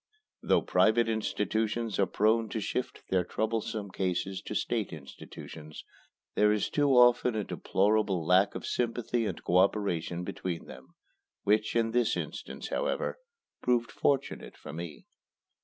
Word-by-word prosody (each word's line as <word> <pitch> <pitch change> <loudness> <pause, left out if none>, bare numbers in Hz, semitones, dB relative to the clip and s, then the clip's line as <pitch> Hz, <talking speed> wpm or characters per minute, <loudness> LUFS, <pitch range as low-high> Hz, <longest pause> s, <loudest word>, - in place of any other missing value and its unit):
Though - - +3
private 115 +1 +3
institutions 110 0 -1
are 100 - +4
prone 110 +4 +2
to 110 - -2
shift 125 +4 -3
their 95 -1 +3
troublesome 110 +1 -2
cases 95 +1 -2
to 105 - -4
state 110 -2 -1
institutions, 75 +1 -10 0.5
there 105 0 +4
is 105 -1 0
too 145 -1 +2
often 120 -1 +5
a 105 - 0
deplorable 100 -3 +1
lack 95 +4 +4
of - - -5
sympathy 120 -1 -1
and - - -5
co 90 - +2
operation 90 -3 +1
between 90 -1 -4
them, - - -13 0.5
which, 105 +2 +2
in 115 -1 +2
this 120 -1 +2
instance, - - -6
however, - - -1 0.4
proved 120 -1 +1
fortunate 140 -1 -1
for - - -9
me. 85 -1 -7
105 Hz, 140 wpm, -30 LUFS, 95-115 Hz, 0.5 s, often